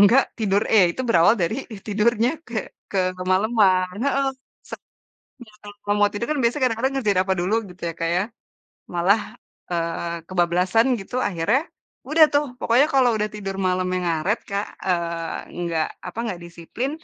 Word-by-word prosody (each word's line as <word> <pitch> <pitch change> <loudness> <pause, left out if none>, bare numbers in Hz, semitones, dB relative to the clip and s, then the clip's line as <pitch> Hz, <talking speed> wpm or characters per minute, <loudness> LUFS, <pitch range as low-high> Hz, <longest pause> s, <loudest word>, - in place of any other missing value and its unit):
enggak 235 +7 +6
tidur 205 -1 +2
e 220 - +6
itu 260 - -4
berawal 175 0 +5
dari 220 +11 -1 0.2
tidurnya 225 +3 +2 0.2
ke 240 - -5 0.3
ke 195 - -1 0.2
kemaleman. 185 -1 +2
Heeh, 275 -1 +1 0.4
sek - - -6 0.7
ya 215 - -19
ka - - -11 0.2
kalau 205 0 +1
mau 205 - +5
tidur 210 +3 -3
kan, 300 - 0
biasanya 245 +4 +1
kadang-kadang 260 +4 -1
ngerjain 205 -6 +2
apa 190 - +3
dulu, 185 +5 +1
gitu 180 0 -15
ya - - -5
Kak 165 - 0
ya. 180 - +2 0.7
Malah, 190 +5 +3 0.5
eee, 170 0 -2
kebablasan 180 +5 +2
gitu 195 +6 -7
akhirnya 200 +8 +1 0.5
udah 315 +2 +7
tuh 290 +1 +4 0.2
pokoknya 245 +5 +4
kalau 260 -2 +5
udah 210 0 0
tidur 195 -2 -5
malemnya 185 0 0
ngaret 170 +6 0
Kak, 200 +1 -1 0.2
eee, 170 -2 -1 0.2
enggak 170 -2 -1 0.2
apa 180 +5 -8
enggak 200 -7 -4
disiplin, 170 +10 -5
200 Hz, 160 wpm, -23 LUFS, 175-230 Hz, 0.7 s, udah